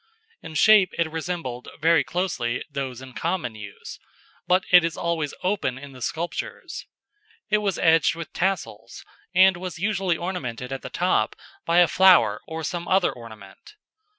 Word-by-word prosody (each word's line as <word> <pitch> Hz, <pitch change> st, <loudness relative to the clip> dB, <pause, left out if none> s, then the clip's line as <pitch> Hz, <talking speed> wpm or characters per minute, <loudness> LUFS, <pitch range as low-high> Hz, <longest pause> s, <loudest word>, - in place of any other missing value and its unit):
In 160 Hz, -, -10 dB
shape 210 Hz, 0 st, +5 dB
it 165 Hz, -1 st, 0 dB
resembled, 160 Hz, -7 st, -5 dB
very 160 Hz, -1 st, +4 dB
closely, 135 Hz, -9 st, -2 dB
those 130 Hz, -2 st, -5 dB
in 130 Hz, -1 st, -11 dB
common 165 Hz, -7 st, -2 dB
use; 100 Hz, -2 st, -10 dB, 0.5 s
but 185 Hz, +1 st, +3 dB
it 180 Hz, -1 st, +8 dB
is 165 Hz, -1 st, -2 dB
always 165 Hz, -4 st, -2 dB
open 180 Hz, -9 st, -1 dB
in 140 Hz, +1 st, -10 dB
the 130 Hz, -1 st, -13 dB
sculptures. 170 Hz, +6 st, -5 dB, 0.6 s
It 210 Hz, -, +4 dB
was 200 Hz, -3 st, -1 dB
edged 160 Hz, -1 st, +3 dB
with 165 Hz, -1 st, -8 dB
tassels, 170 Hz, -, -3 dB, 0.3 s
and 190 Hz, 0 st, +6 dB
was 180 Hz, -1 st, -6 dB
usually 190 Hz, -2 st, 0 dB
ornamented 135 Hz, -9 st, -5 dB
at 135 Hz, -, -5 dB
the -, -, -7 dB
top -, -, 0 dB, 0.3 s
by 170 Hz, +1 st, +2 dB
a 175 Hz, -1 st, +7 dB
flower 175 Hz, -, +5 dB
or 160 Hz, 0 st, -5 dB
some 175 Hz, +2 st, -4 dB
other 190 Hz, +1 st, +3 dB
ornament. 110 Hz, -, -13 dB
165 Hz, 155 wpm, -24 LUFS, 130-180 Hz, 0.6 s, it